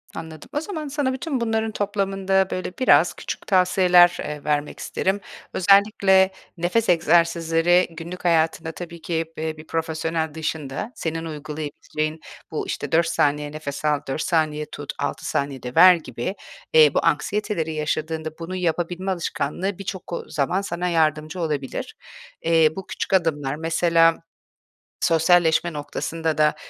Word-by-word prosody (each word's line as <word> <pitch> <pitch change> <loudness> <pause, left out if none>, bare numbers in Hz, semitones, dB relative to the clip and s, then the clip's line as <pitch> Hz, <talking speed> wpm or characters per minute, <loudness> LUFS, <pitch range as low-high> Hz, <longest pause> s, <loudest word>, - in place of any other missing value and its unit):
Anladım. 160 -2 -9
O 295 - +1
zaman 320 -5 -5
sana 275 -2 -1
bütün 265 -1 -3
bunların 225 -1 0
toplamında, 195 -2 0
böyle, 185 0 -3
biraz 255 - +5
küçük - - -7
tavsiyeler, 180 -2 +5
eee, 150 -1 -5
vermek 150 0 -1
isterim. 190 +2 -1 0.3
Özellikle 195 0 +4 0.3
nefes 180 +7 0
egzersizleri 170 0 +3
günlük 170 +3 -8
hayatında 160 -1 +2
tabii 170 0 -9
ki 165 -1 -1
b - - -4
eee, 160 -1 -3
bir 155 +1 -12
profesyonel 160 -1 -2
dışında 160 - -4
senin 165 0 -3
uygulayabileceğin 155 0 -5 0.3
bu - - -3
işte - - -4
4 165 0 +3
saniye 150 -2 +1
nefes 150 -1 -6
al, 150 -1 +2
4 135 +3 -2
saniye 155 -3 0
tut, - - -6
6 - - -3
saniyede 135 -3 -3
ver 185 0 +9
gibi, 130 - -5 0.4
eee, 155 -3 +7
bu - - +1
anksiyeteleri 165 -1 0
yaşadığında 155 +1 -2
bunu 170 +3 -5
yapabilme 175 +1 -1
alışkanlığı 180 +2 -2
birçok, 190 -3 -6
ııı, - - -5
zaman 165 +7 0
sana 180 -2 -3
yardımcı 155 0 0
olabilir. 150 -5 -3 0.5
Eee, 165 -1 +4
bu 190 - -7
küçük - - -4
adımlar, 150 -6 +1
mesela 165 +1 +3 0.9
sosyalleşme 170 0 +3
noktasında 160 +2 -3
da, 150 0 +4
165 Hz, 140 wpm, -23 LUFS, 155-185 Hz, 0.9 s, ver